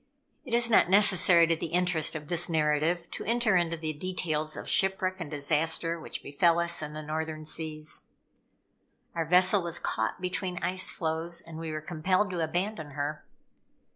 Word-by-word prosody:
It 240 -3 -1
is 235 0 +3
not 220 -6 +4
necessary 185 -3 +6
to 165 0 +1
the 160 - -4
interest 170 -2 0
of 150 -2 -6
this 175 +2 0
narrative 160 +2 0
to - - -5
enter 230 -2 +2
into 170 -1 +1
the 155 -1 -3
details 155 -2 -2
of - - -7
shipwreck 190 -1 +2
and 170 -4 -5
disaster, 160 +3 0
which - - -7
befel 165 +4 +2
us 170 -1 +1
in 150 0 -5
the 155 0 -6
Northern 155 0 -4
Seas. 155 -1 -2 1.1
Our 165 -1 -2
vessel 185 +3 +5
was 170 -1 -2
caught 110 +9 -2
between 180 0 -3
ice 185 +1 0
floes, 165 +1 -2
and 165 -1 -10
we 165 -1 -5
were 155 0 -4
compelled 185 +5 0
to 175 -2 -1
abandon 165 -2 -3
her. 145 +1 -3
170 Hz, 170 wpm, -28 LUFS, 155-180 Hz, 1.1 s, necessary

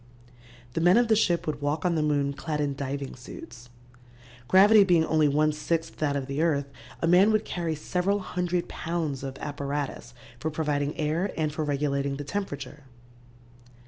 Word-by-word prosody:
The 165 - -1
men 175 +5 +6
of 240 -1 +3
the 220 - +5
ship 175 -5 +2
would 150 -2 -3
walk 145 +2 -1
on 175 - +2
the 160 - +1
moon 145 -2 +1
clad 150 +1 -4
in 145 -1 0
diving 140 0 -4
suits. 120 -1 -11 0.8
Gravity 205 - +7
being 175 -4 +3
only 155 -1 +3
one 150 +2 +2
sixth 165 +2 -2
that 145 -2 0
of 140 -2 -2
the 140 +3 -2
earth, 150 -4 +1 0.4
a - - +3
man 185 +5 +6
would 215 0 +1
carry 170 -3 -2
several 180 +6 0
hundred 180 -2 -2
pounds 160 -5 -3
of 135 -1 -6
apparatus 140 -4 -4 0.2
for 160 - -2
providing 150 -2 -1
air 160 +6 0
and 155 -2 0
for 155 - -2
regulating 140 -1 -1
the 145 - -5
temperature. 145 -5 -5
150 Hz, 175 wpm, -27 LUFS, 140-175 Hz, 0.8 s, Gravity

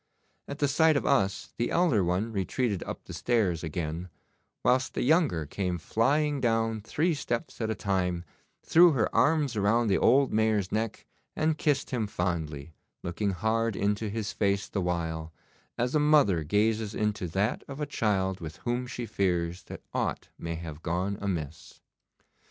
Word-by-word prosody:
At 140 - -6
the 145 - +2
sight 155 +2 +4
of - - -2
us 95 -1 +1
the 120 - 0
elder 155 - +3
one 90 +6 0
retreated 100 +1 -1
up - - -6
the - - -9
stairs 100 -9 0
again, 80 +2 -4 0.5
whilst 130 0 +2
the - - 0
younger 140 - +2
came 90 +3 -2
flying 140 - +1
down 115 -2 +1
three 160 - 0
steps 120 -5 -3
at 110 - -1
a 110 - -1
time, 90 -3 -1 0.4
threw 170 0 +6
her 115 -5 0
arms 145 -5 +3
round 110 +2 +2
the - - +3
old 135 +3 +4
Mayor's 110 -3 +1
neck, 110 0 -2 0.3
and 155 0 +1
kissed 145 -2 0
him 115 -5 -1
fondly, 80 -5 -3 0.3
looking 90 +4 -1
hard 110 +3 0
into 105 +2 0
his 105 0 -3
face 100 -1 0
the 100 - -2
while, 80 -2 -2 0.5
as 125 +2 0
a 155 - +3
mother 145 - +4
gazes 105 +5 +1
into 105 -3 -1
that 95 +7 -1
of 135 +1 -8
a 150 - -1
child 95 -8 0
with 80 -1 -7
whom 120 +1 -1
she 120 0 -5
fears 90 -4 -1
that - - -9
aught - - -2
may 85 0 -4
have 80 -2 -7
gone 90 +4 -1
amiss. 80 -4 -4
105 Hz, 165 wpm, -28 LUFS, 90-125 Hz, 0.5 s, threw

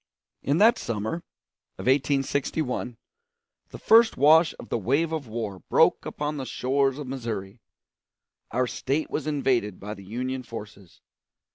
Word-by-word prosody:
In 140 +3 +1
that 230 +5 +5
summer 110 +5 -3 0.6
of - - -7
1861 135 -1 0 0.7
the - - -9
first 225 0 +5
wash 155 +4 +5
of - - -11
the - - 0
wave 140 - +1
of 155 -5 -3
war 110 -4 -5
broke - - +3
upon 150 0 -3
the 135 - -4
shores 135 +1 0
of 150 - -6
Missouri. 115 -5 -5 0.9
Our 125 +2 +1
State 140 +5 -2
was 150 0 -3
invaded 130 -9 0
by 105 +2 -6
the 100 - -12
Union 130 +6 -4
forces. 105 -6 -10
130 Hz, 140 wpm, -26 LUFS, 115-145 Hz, 0.9 s, that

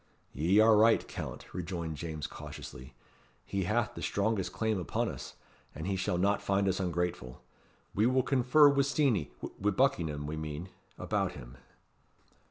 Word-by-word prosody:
"Ye 85 - +3
are 110 0 +7
right, 115 +1 +4
Count," - - -6
rejoined 85 -3 -4
James 75 -1 -5
cautiously. 65 +1 -9 0.5
"He 95 -2 -2
hath 110 +4 0
the - - -8
strongest 100 -1 0
claim 110 -3 -1
upon 85 - -1
us, - - -8 0.4
and 80 - -5
he 100 0 0
shall 95 -1 -1
not 100 +3 +2
find 100 0 +1
us 95 0 +1
ungrateful. 90 -8 -3 0.5
We 105 +4 +3
will 130 0 +3
confer 135 +3 +5
wi' 140 -1 +4
Steenie 135 - +1 0.3
wi' 105 - +2
Buckingham, 85 - +1
we 75 +2 -4
mean 80 +3 -5 0.3
about - - -1
him." - - -11
95 Hz, 155 wpm, -31 LUFS, 80-110 Hz, 0.5 s, are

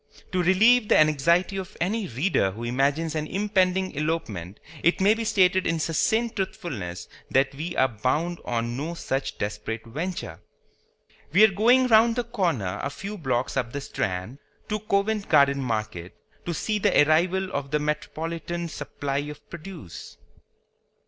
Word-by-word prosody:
To 185 -2 +1
relieve 215 +6 +5
the - - +6
anxiety 160 +6 +3
of 190 -2 -7
any 200 +4 -1
reader 135 - +1
who 110 +5 -8
imagines 140 +6 0
an 155 -1 -2
impending 190 -1 +1
elopement 125 - -3 0.2
it 170 - +2
may 200 +3 +5
be 225 +1 -3
stated 190 -4 +3
in 165 - +1
succinct 220 +9 0
truthfulness 125 - -4 0.2
that 135 +1 +2
we 155 +5 -5
are 130 - +4
bound 130 +9 -1
on 120 0 -2
no 155 +6 -4
such 135 -4 -3
desperate 105 +2 -4
venture. 145 - -5 0.9
We 190 +7 +6
are 220 - +7
going 240 +6 +4
round 230 -1 +5
the 245 - 0
corner 170 - -1
a 140 - -2
few 200 +8 -7
blocks 130 -8 -1
up 120 -3 -2
the 140 - -3
Strand, 110 -2 -3 0.3
to 215 0 -1
Covent 210 0 0
Garden 140 -2 +5
Market, 110 -7 -3 0.3
to 170 - -1
see 215 +6 -1
the 195 -7 +4
arrival 185 +4 +2
of 140 -1 -3
the 150 - +1
metropolitan 165 +3 -3
supply 145 -2 -4
of 150 +1 -7
produce. 170 - -9
160 Hz, 155 wpm, -25 LUFS, 135-190 Hz, 0.9 s, are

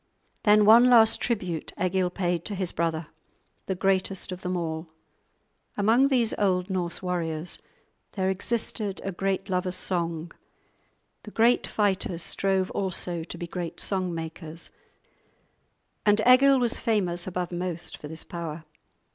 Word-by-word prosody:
Then 210 0 +6
one 235 +4 +8
last 225 -2 +6
tribute 185 -9 -2
Egil 185 0 +1
paid 175 -2 -1
to 205 - -2
his 185 -2 -2
brother, 165 -1 -1 0.6
the 190 - -1
greatest 190 0 0
of 185 0 -6
them 180 0 -2
all. 160 -1 -4 0.9
Among 225 +6 +4
these 245 -5 +2
old 185 -2 +1
Norse 180 -1 -2
warriors 170 -2 -2 0.5
there 190 -2 -1
existed 205 +1 -2
a 195 - -3
great 195 +1 -2
love 185 -1 -1
of 180 - -3
song; 170 -3 -2 0.9
the - - -10
great 230 +3 +3
fighters 190 -5 0
strove 190 -1 0
also 180 -3 -2
to 170 - -8
be 175 - -5
great 170 -1 -5
song 185 -2 0
makers, 165 0 -7 1.3
and 210 0 +4
Egil 270 +2 +7
was 245 -1 +1
famous 185 -6 -1
above 180 -1 -3
most 175 -1 -4
for 150 - -9
this 160 +1 -7
power. 165 -2 -6
185 Hz, 140 wpm, -26 LUFS, 170-205 Hz, 1.3 s, one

